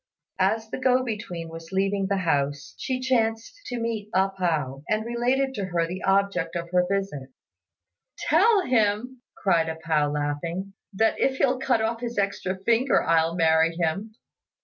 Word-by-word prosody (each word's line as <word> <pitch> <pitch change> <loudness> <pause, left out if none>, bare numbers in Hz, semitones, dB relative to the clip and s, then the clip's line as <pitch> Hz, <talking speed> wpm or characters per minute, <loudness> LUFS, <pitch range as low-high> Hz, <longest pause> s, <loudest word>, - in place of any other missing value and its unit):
As 220 0 +1
the - - -4
go 255 0 +3
between 205 -8 -5
was 165 0 -10
leaving 195 0 0
the 200 - +1
house, 145 -5 -1
she 255 -1 -2
chanced 230 - 0
to 245 -1 -3
meet 225 -3 -3
A 190 +1 +3
pao, 155 -8 -2
and 215 +1 0
related 250 +3 0
to 200 -6 -3
her 175 -2 0
the 180 +3 -6
object 195 -3 +1
of 170 0 -4
her 180 0 +3
visit. 195 -9 -2 0.9
"Tell 390 +6 +4
him," 240 +1 +1 0.2
cried 170 -4 +2
A 160 - -3
pao, 160 -2 0
laughing, 150 +6 -3 0.2
"that 220 +3 +1
if 265 0 +1
he'll 260 -1 +2
cut 250 -4 +1
off 230 +1 -1
his 240 -2 -4
extra 195 -2 -1
finger, 235 +4 +3
I'll 165 0 +2
marry 165 -1 +3
him." 195 +7 -2
195 Hz, 165 wpm, -25 LUFS, 165-235 Hz, 0.9 s, Tell